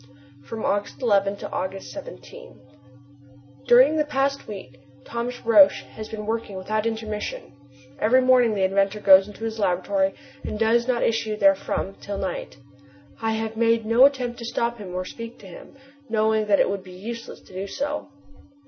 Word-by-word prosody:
From 220 Hz, +9 st, -6 dB
August 205 Hz, +1 st, -1 dB
11 200 Hz, -3 st, +2 dB
to -, -, -8 dB
August 190 Hz, +1 st, -4 dB
17. -, -, -11 dB, 1.1 s
During 260 Hz, +6 st, +6 dB
the 305 Hz, -, +3 dB
past 275 Hz, -1 st, -1 dB
week 130 Hz, -12 st, -9 dB, 0.3 s
Thomas 235 Hz, +1 st, -4 dB
Roch 205 Hz, -4 st, +8 dB, 0.2 s
has 215 Hz, 0 st, -8 dB
been 215 Hz, -1 st, -6 dB
working 220 Hz, -3 st, -3 dB
without 215 Hz, +4 st, -1 dB
intermission. 220 Hz, -6 st, -5 dB, 0.5 s
Every 240 Hz, +4 st, +4 dB
morning 255 Hz, -3 st, +4 dB
the 195 Hz, -, 0 dB
inventor 195 Hz, +2 st, +1 dB
goes 195 Hz, 0 st, +6 dB
to 215 Hz, -, -12 dB
his 225 Hz, 0 st, -4 dB
laboratory 190 Hz, 0 st, +1 dB, 0.3 s
and -, -, -4 dB
does 230 Hz, +2 st, +2 dB
not 245 Hz, -2 st, +1 dB
issue 220 Hz, -1 st, 0 dB
therefrom 195 Hz, -1 st, +1 dB
till 200 Hz, -1 st, -5 dB
night. -, -, -5 dB, 0.6 s
I 225 Hz, 0 st, 0 dB
have 220 Hz, 0 st, -3 dB
made 230 Hz, 0 st, +2 dB
no 230 Hz, +4 st, +6 dB
attempt 250 Hz, -4 st, -4 dB
to 235 Hz, -, -6 dB
stop 235 Hz, 0 st, -2 dB
him 185 Hz, -3 st, -8 dB
or 185 Hz, 0 st, -2 dB
speak 230 Hz, +4 st, -8 dB
to -, -, -16 dB
him, 180 Hz, -, -13 dB, 0.3 s
knowing 220 Hz, -1 st, +1 dB
that 200 Hz, -1 st, +4 dB
it -, -, +4 dB
would 195 Hz, -1 st, -3 dB
be 185 Hz, -1 st, -12 dB
useless 230 Hz, +5 st, -8 dB
to -, -, -18 dB
do 190 Hz, +2 st, -4 dB
so. 290 Hz, +7 st, -4 dB
220 Hz, 170 wpm, -24 LUFS, 195-235 Hz, 1.1 s, Roch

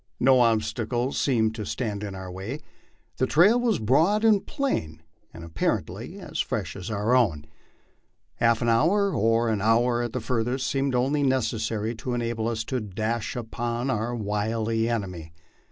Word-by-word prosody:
No 130 Hz, 0 st, +5 dB
ob 115 Hz, -2 st, +3 dB
stacle 120 Hz, +2 st, -2 dB
seemed 110 Hz, -5 st, +1 dB
to 110 Hz, -1 st, -5 dB
stand 105 Hz, -1 st, -3 dB
in 100 Hz, -2 st, -5 dB
our 95 Hz, -1 st, -7 dB
way; 100 Hz, +10 st, -5 dB, 0.6 s
the 130 Hz, -, +1 dB
trail 200 Hz, +10 st, +5 dB
was 235 Hz, -5 st, +1 dB
broad 160 Hz, -, +2 dB
and 210 Hz, -3 st, +4 dB
plain, 80 Hz, -, -2 dB, 0.3 s
and 85 Hz, -, -10 dB
appar 85 Hz, -1 st, 0 dB
ently -, -, -9 dB
as -, -, -7 dB
fresh -, -, -2 dB
as 90 Hz, +1 st, -6 dB
our 105 Hz, +3 st, 0 dB
own. 85 Hz, -13 st, +2 dB, 0.9 s
A -, -, +2 dB
half 115 Hz, 0 st, +3 dB
hour, 170 Hz, -, +3 dB
or 115 Hz, 0 st, +2 dB
an 110 Hz, -3 st, 0 dB
hour 120 Hz, +3 st, +3 dB
at 120 Hz, +1 st, -3 dB
furthest, 125 Hz, +2 st, -1 dB
seemed 135 Hz, -2 st, 0 dB
only 135 Hz, +4 st, +1 dB
necessary 115 Hz, -4 st, 0 dB
to 125 Hz, +1 st, -3 dB
enable 115 Hz, -2 st, -2 dB
us 115 Hz, -1 st, -2 dB
to 130 Hz, +2 st, -2 dB
dash 110 Hz, +2 st, -3 dB
in 120 Hz, -, -2 dB
upon 120 Hz, +3 st, -3 dB
our 120 Hz, +1 st, -1 dB
wily 110 Hz, +1 st, -1 dB
enemy. 90 Hz, -8 st, -4 dB
115 Hz, 170 wpm, -26 LUFS, 110-130 Hz, 0.9 s, No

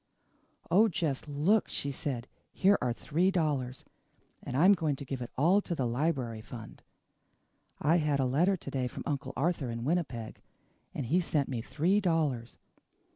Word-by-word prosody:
"Oh, 210 Hz, +6 st, +6 dB
just 160 Hz, -8 st, -2 dB
look," 155 Hz, +10 st, +2 dB
she 140 Hz, -, -3 dB
said. 130 Hz, -3 st, -4 dB, 0.2 s
"Here 195 Hz, +2 st, +4 dB
are 125 Hz, -, +1 dB
three 165 Hz, +9 st, +1 dB
dollars 145 Hz, -9 st, -1 dB, 0.6 s
and 125 Hz, -, -4 dB
I'm 185 Hz, +7 st, +7 dB
going 155 Hz, -6 st, 0 dB
to 140 Hz, -, -8 dB
give 130 Hz, -1 st, -4 dB
it 120 Hz, -, -5 dB
all 175 Hz, +9 st, +4 dB
to 175 Hz, -, -3 dB
the 135 Hz, -, -1 dB
library 120 Hz, -3 st, -1 dB
fund. 115 Hz, 0 st, -10 dB, 1.0 s
I 165 Hz, +3 st, +3 dB
had 150 Hz, -4 st, +1 dB
a 135 Hz, -, +2 dB
letter 170 Hz, +10 st, +2 dB
to -, -, -8 dB
day 130 Hz, -2 st, -1 dB
from -, -, -7 dB
Uncle 140 Hz, -2 st, -2 dB
Arthur 155 Hz, -3 st, 0 dB
in 115 Hz, 0 st, -4 dB
Winnipeg, 135 Hz, -9 st, -2 dB, 0.5 s
and 135 Hz, -, -2 dB
he 165 Hz, +9 st, +2 dB
sent 155 Hz, -5 st, 0 dB
me 120 Hz, -4 st, -2 dB
three 170 Hz, -, +1 dB
dollars. 150 Hz, -, 0 dB
145 Hz, 170 wpm, -30 LUFS, 125-170 Hz, 1.0 s, I'm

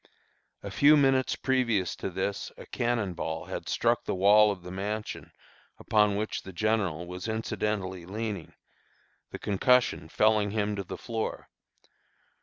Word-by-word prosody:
A -, -, -6 dB
few 150 Hz, +2 st, +6 dB
minutes 135 Hz, -2 st, +3 dB
previous 120 Hz, -8 st, +1 dB
to -, -, -3 dB
this 95 Hz, +2 st, -3 dB
a -, -, -10 dB
cannon 115 Hz, -6 st, -1 dB
ball 80 Hz, -1 st, -4 dB
had -, -, -6 dB
struck -, -, +1 dB
the -, -, -2 dB
wall 105 Hz, +3 st, +6 dB
of 95 Hz, -3 st, -4 dB
the 90 Hz, -, -8 dB
mansion 105 Hz, +3 st, -4 dB, 0.5 s
upon 105 Hz, -2 st, +2 dB
which 110 Hz, +2 st, -2 dB
the 95 Hz, -, -9 dB
General 95 Hz, -4 st, 0 dB
was 90 Hz, +3 st, -6 dB
incidentally 105 Hz, -5 st, -2 dB
leaning, 105 Hz, -3 st, -5 dB, 0.7 s
the -, -, -7 dB
concussion 105 Hz, -5 st, +2 dB
felling 105 Hz, +2 st, +3 dB
him 105 Hz, 0 st, -1 dB
to 100 Hz, -, -3 dB
the 90 Hz, -, -7 dB
floor. 115 Hz, -2 st, -4 dB
105 Hz, 145 wpm, -28 LUFS, 95-110 Hz, 0.7 s, few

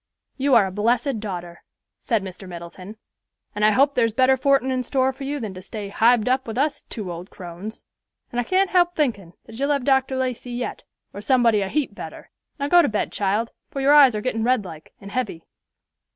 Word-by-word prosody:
"You 275 Hz, -1 st, +2 dB
are 220 Hz, -4 st, +6 dB
a 190 Hz, -, -4 dB
blessed 235 Hz, +5 st, 0 dB
daughter," 175 Hz, -5 st, -6 dB, 0.4 s
said 225 Hz, -6 st, 0 dB
Mr. 190 Hz, 0 st, -9 dB
Middleton, 180 Hz, +4 st, -9 dB, 0.6 s
"and 210 Hz, -, -2 dB
I 215 Hz, -, +7 dB
hope 275 Hz, +6 st, +3 dB
there's 230 Hz, -4 st, +1 dB
better 260 Hz, +2 st, +4 dB
fortin 270 Hz, -1 st, +2 dB
in 255 Hz, -1 st, 0 dB
store 260 Hz, +1 st, 0 dB
for 270 Hz, +1 st, -8 dB
you 290 Hz, +1 st, -3 dB
than 215 Hz, -6 st, -5 dB
to 185 Hz, -, -9 dB
stay 205 Hz, +1 st, -7 dB
hived 230 Hz, +2 st, +3 dB
up 260 Hz, 0 st, +1 dB
with 225 Hz, -, -5 dB
us 290 Hz, +2 st, 0 dB
two 205 Hz, -6 st, -6 dB
old 175 Hz, +3 st, -8 dB
crones; 180 Hz, +4 st, -9 dB, 0.5 s
and 240 Hz, -, -2 dB
I -, -, +1 dB
can't 375 Hz, +8 st, +1 dB
help 350 Hz, -1 st, +3 dB
thinkin' 205 Hz, -, -1 dB
that 225 Hz, +1 st, -11 dB
you'll 280 Hz, +1 st, 0 dB
have 280 Hz, -3 st, 0 dB
Dr. 265 Hz, -1 st, +2 dB
Lacey 255 Hz, -1 st, -3 dB
yet, 240 Hz, 0 st, -4 dB, 0.3 s
or 200 Hz, -, -7 dB
somebody 235 Hz, -3 st, +3 dB
a 195 Hz, -, -2 dB
heap 300 Hz, +2 st, -1 dB
better. -, -, -10 dB, 0.3 s
Now 280 Hz, -1 st, -2 dB
go 350 Hz, +3 st, +6 dB
to -, -, +1 dB
bed, 215 Hz, -, -2 dB
child, 205 Hz, +3 st, -1 dB, 0.2 s
for 275 Hz, -, -5 dB
your 275 Hz, +2 st, +4 dB
eyes 275 Hz, -6 st, +7 dB
are 210 Hz, -, -2 dB
gettin' 225 Hz, -2 st, -2 dB
red 245 Hz, -3 st, +2 dB
like, 160 Hz, -3 st, -11 dB
and 200 Hz, 0 st, -10 dB
heavy." 225 Hz, -10 st, -3 dB
235 Hz, 215 wpm, -23 LUFS, 200-265 Hz, 0.6 s, I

